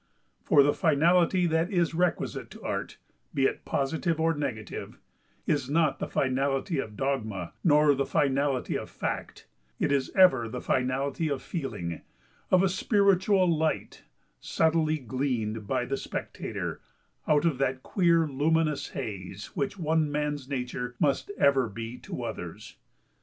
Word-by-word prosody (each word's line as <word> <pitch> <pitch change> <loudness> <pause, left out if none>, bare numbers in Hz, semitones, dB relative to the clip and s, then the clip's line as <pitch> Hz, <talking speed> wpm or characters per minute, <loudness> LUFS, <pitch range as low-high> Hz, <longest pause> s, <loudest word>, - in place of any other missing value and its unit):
For 140 - +5
the 145 +1 +3
finality 175 +3 +3
that 165 +1 +1
is 175 -3 +1
requisite 175 +1 -1
to - - -13
Art, - - -3 0.4
be 135 - +3
it - - -1
positive 160 +4 -1
or 165 +1 +3
negative, 120 - -5 0.5
is 140 -3 0
not 160 +1 +2
the - - -2
finality 135 +4 0
of 110 -5 -5
dogma, 110 -10 -2
nor 150 -3 +5
the 140 0 -1
finality 140 -2 +1
of - - -4
fact, - - -5 0.3
it - - +1
is 140 -2 +1
ever 155 - +5
the 125 - -5
finality 135 +6 0
of 140 -2 -3
feeling—of 135 - -3
a - - +4
spiritual 195 -1 +3
light, 160 -2 -1 0.4
subtly 160 -1 +1
gleaned 120 -5 -2
by 125 0 0
the 135 +2 -2
spectator - - -5 0.5
out 150 +1 +3
of 155 -6 +1
that 130 -1 0
queer 170 -4 +3
luminous 150 +2 +1
haze 100 -1 -6
which 140 +7 -2
one 160 -3 +1
man's 145 -2 -2
nature 125 -2 -4
must 140 +3 +1
ever 135 -4 +3
be 115 +3 -7
to - - -6
others. - - -7
140 Hz, 140 wpm, -28 LUFS, 130-165 Hz, 0.5 s, For